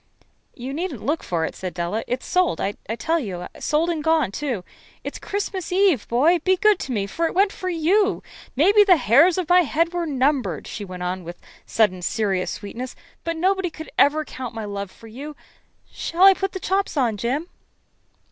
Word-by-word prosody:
"You 260 +2 -6
needn't 350 +6 -4
look 300 +3 0
for 165 -2 -1
it," - - -6
said 185 -1 -6
Della. 175 +6 -2
"It's 250 +1 -3
sold, 365 -1 +1
I 195 - 0 0.3
tell 330 +5 0
you 185 - -5
sold 320 +3 +1
and 315 -3 -3
gone, 320 -9 +2
too. 245 -5 -3 0.4
It's - - -6
Christmas 390 -3 -4
Eve, 370 - +3
boy. 305 +9 +3
Be 375 +3 +2
good 425 0 +4
to 265 - -5
me, 205 -5 0
for 330 +12 -1
it - - -6
went 395 +2 +4
for 370 - -5
you. 365 +5 +2 0.3
Maybe 400 - +6
the 375 -4 +5
hairs 285 - +5
of 365 -3 -1
my 360 +2 +6
head 335 +2 0
were 345 -1 -1
numbered," 260 - 0
she 210 - -6
went 180 -2 -7
on 180 +1 -3
with 175 +1 -8
a - - -28 0.2
sudden 195 -5 +2
serious 195 -1 -1
sweetness, 240 +5 -6 0.3
"but 335 -1 -3
nobody 380 +1 +1
could 315 0 -10
ever 305 +2 +4
count 250 -4 -7
my 220 -1 -4
love 200 -1 -5
for 225 - -17
you. 275 +7 -8 0.6
Shall 345 +3 -1
I 390 0 +10
put 390 0 -3
the 380 - -4
chops 385 -2 -1
on, 240 -5 +2
Jim?" 260 - -2
295 Hz, 200 wpm, -23 LUFS, 220-355 Hz, 0.6 s, I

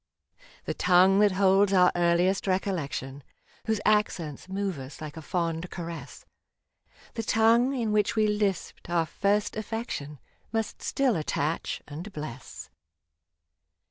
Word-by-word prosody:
The - - -2
tongue 185 +2 +4
that 205 -2 +4
holds 195 +1 +4
our 180 -1 +6
earliest 175 +3 +2
recollection, 155 -8 -2 0.5
Whose 220 -2 +1
accents 185 -7 0
moved 195 -4 -2
us 130 +5 -9
like 155 -2 -7
a 160 - -7
fond 165 +1 -2
caress 170 -1 -8 0.4
— - - -28
The 225 - -3
tongue 230 +4 +3
in 230 -4 -1
which 210 +1 +2
we 215 -1 +3
lisped 205 -4 -1
our 170 -1 +2
first 205 +5 0
affec 225 +2 -4
tion, 145 +1 -5 0.3
Must 225 -1 -3
still 265 -5 +1
attach 155 0 -2
and 165 +8 -7
bless. 150 -7 -8
190 Hz, 135 wpm, -27 LUFS, 165-210 Hz, 0.5 s, our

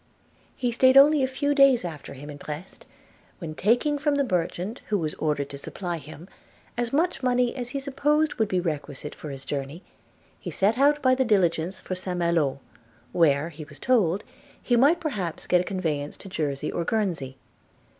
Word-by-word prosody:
He 245 -1 0
staid 260 +3 +5
only 290 +1 +7
a 260 - +2
few 285 +2 0
days 275 -7 +5
after 155 -5 -7
him 145 +3 -9
at 145 - -10
Brest, 155 +6 -8 0.5
when, 165 -4 -6
taking 245 - +2
from 295 0 +1
the 285 - +2
merchant 185 +1 -2
who 210 - +2
was 155 -4 -2
ordered 150 -3 -1
to 140 - -8
supply 175 +3 -5
him, 155 +3 -11 0.5
as 240 0 -2
much 330 +4 +1
money 250 -1 +1
as 245 -2 -4
he 275 - -3
supposed 295 +3 +1
would 220 - +3
be 185 -2 0
requisite 150 -4 -4
for 150 - -9
his 135 -1 -7
journey, 140 +5 -4 0.6
he - - -6
set 215 +5 +1
out 290 +1 +4
by 255 0 +5
the 260 0 +2
diligence 185 -5 +1
for - - -5
St 185 -1 -3
Malo, 170 -6 +1 0.5
where, 155 -2 +3
he 155 -1 -9
was 145 -1 -13
told, 205 -7 +2 0.4
he 245 - +1
might 285 +8 +5
perhaps 200 - -4
get 180 -1 +3
a - - -2
conveyance 160 -7 -3
to - - -11
Jersey 150 -6 -2
or 170 - -2
Guernsey. 165 -11 -2
185 Hz, 185 wpm, -26 LUFS, 155-255 Hz, 0.6 s, only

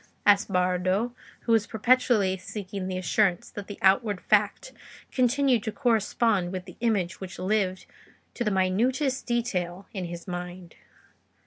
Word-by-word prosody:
asked 205 0 +4
Bardo, 185 +5 +1 0.3
who 230 - -2
was 225 -2 +3
perpetually 225 -4 +3
seeking 190 0 -6
the 185 -1 -3
assurance 185 0 +1
that 205 -1 -7
the 205 - -7
outward 195 +1 +3
fact - - +1 0.4
continued 255 -1 +2
to 220 - -3
correspond 225 -6 +1
with 185 -1 -5
the - - -12
image 205 -7 0
which 190 -1 -7
lived 185 -1 0 0.5
to 240 - -2
the 215 - +1
minutest 240 +9 +1
detail 195 -7 -2
in 190 -4 -3
his 170 +1 -8
mind. 180 -1 -6
200 Hz, 140 wpm, -27 LUFS, 185-230 Hz, 0.5 s, asked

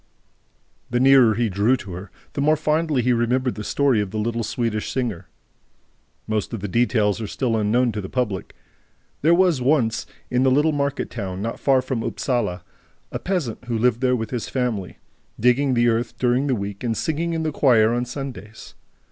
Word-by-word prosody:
The 120 - 0
nearer 130 -4 +6
he 120 +1 +1
drew 105 +6 +2
to 100 - -9
her, 90 +3 -8 0.2
the 140 - -2
more 155 +2 +4
fondly 155 -3 0
he 125 +1 +3
remembered 125 +2 +1
the 105 - -6
story 130 0 +2
of 100 - -3
the 110 - -5
little 115 +2 -1
Swedish 110 -1 -2
singer. 110 -9 -3 1.0
Most 110 0 -2
of - - -6
the 105 - -3
details 110 0 +1
are 110 - -3
still 120 +1 -1
unknown 115 +3 +2
to 105 -1 -4
the 95 - -7
public. 110 -7 -3 0.7
There 165 +4 +5
was 175 -7 +3
once, 125 -4 +1 0.2
in 125 +1 +2
a 135 - +4
little 145 +4 +3
market 140 -1 -2
town 95 -5 -5
not 115 - -4
far 135 -2 +3
from 125 -4 -2
Upsala, 120 -8 -2 0.5
a - - -3
peasant 160 - -3
who 120 -2 -2
lived 120 +1 +2
there 125 -1 +3
with 110 -2 -4
his 120 -3 -3
family, 120 -8 -2 0.4
digging 125 +3 +3
the 120 0 +3
earth 115 +1 0
during 125 +3 +1
the 130 - +1
week 100 0 -5
and 115 -2 -1
singing 165 +2 -1
in 165 -1 -1
the 155 - -1
choir 115 -6 +4
on 120 +1 0
Sundays. 125 -5 -8
120 Hz, 190 wpm, -22 LUFS, 110-135 Hz, 1.0 s, nearer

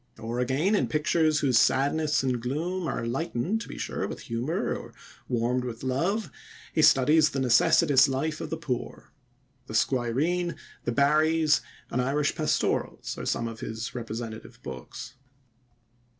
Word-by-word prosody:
Or, 115 +2 -4
again, 135 - +1
in 205 - +2
pictures 155 0 +2
whose 130 -5 +4
sadness 145 +3 +2
and 125 -3 0
gloom 165 +8 -2
are 115 - -2
lightened, 165 - -1
to - - -7
be - - -8
sure, - - -3
with - - -7
humor 120 +8 -2
or - - -9 0.3
warmed 125 +1 0
with 120 -1 -6
love, 170 - -1 0.4
he 155 - +2
studies 150 +3 +5
the 135 - -3
necessitous 130 +3 +5
life 150 +4 -2
of - - -5
the 160 - -3
poor. 140 -7 -5 0.6
The - - -6
Squireen, 150 +8 +1 0.3
The 120 - 0
Barrys, 155 +3 +3 0.3
and 125 - +1
Irish 145 +3 +1
Pastorals 155 -1 -1
are - - -5
some 115 - 0
of 115 -1 -7
his 110 +1 -5
representative 115 -1 -6
books. 65 - -8
135 Hz, 150 wpm, -27 LUFS, 120-155 Hz, 0.6 s, studies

